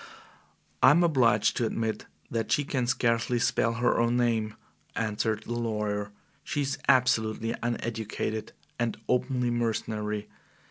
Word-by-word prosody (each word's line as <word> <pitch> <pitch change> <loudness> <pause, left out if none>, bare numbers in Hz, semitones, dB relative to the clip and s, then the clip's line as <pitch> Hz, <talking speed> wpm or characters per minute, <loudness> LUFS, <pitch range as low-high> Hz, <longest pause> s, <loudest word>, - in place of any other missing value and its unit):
"I - - +8
am 165 +5 +5
obliged 125 -10 +3
to 120 - +1
admit 110 -1 -3 0.2
that 115 -2 -2
she 145 - +3
can 130 -3 -1
scarcely 120 0 +1
spell 115 0 +1
her 120 +1 +1
own 120 +1 +2
name," 110 -3 +1 0.4
answered 110 0 -1
the 120 - -4
lawyer. 105 -3 -2 0.3
"She 145 - -2
is 135 0 -2
absolutely 115 -4 +3
uneducated 110 -2 -3 0.3
and 120 -1 -1
openly 125 -1 +1
mercenary. 105 -2 -2
115 Hz, 130 wpm, -28 LUFS, 110-125 Hz, 0.4 s, I